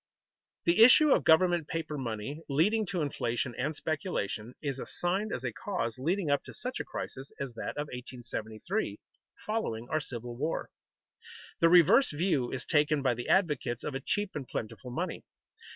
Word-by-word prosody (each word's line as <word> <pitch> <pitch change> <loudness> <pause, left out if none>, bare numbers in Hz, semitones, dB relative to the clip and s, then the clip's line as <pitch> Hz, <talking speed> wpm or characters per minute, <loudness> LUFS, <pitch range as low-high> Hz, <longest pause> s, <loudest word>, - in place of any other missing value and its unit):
The 170 +5 +4
issue 285 +5 +8
of - - +4
government 170 -1 +4
paper 165 -2 -3
money, 130 +3 -4
leading 205 +10 +2
to 180 -2 -1
inflation 120 -3 -2
and 155 - -2
speculation, 125 - -3
is 140 -3 -3
assigned 190 +9 -1
as - - -3
a - - -2
cause 125 - -3
leading 165 +3 0
up 145 - +2
to - - -10
such 255 +1 -4
a - - -1
crisis 135 +1 -6
as 135 -3 -4
that 115 - -5
of 145 - -1
1873, 125 - -4 0.5
following 120 - -2
our 155 - +1
Civil 120 -3 -6
War. 150 +6 -2 0.9
The 165 - +6
reverse 180 - +7
view 150 -5 0
is 130 - -3
taken 150 -2 +2
by 125 -2 +3
the 120 +1 -5
advocates 150 - +1
of 150 - -3
a 135 - -2
cheap 205 +8 -1
and 140 -4 -5
plentiful 115 +3 -5
money. 125 - -3
150 Hz, 170 wpm, -30 LUFS, 125-180 Hz, 0.9 s, issue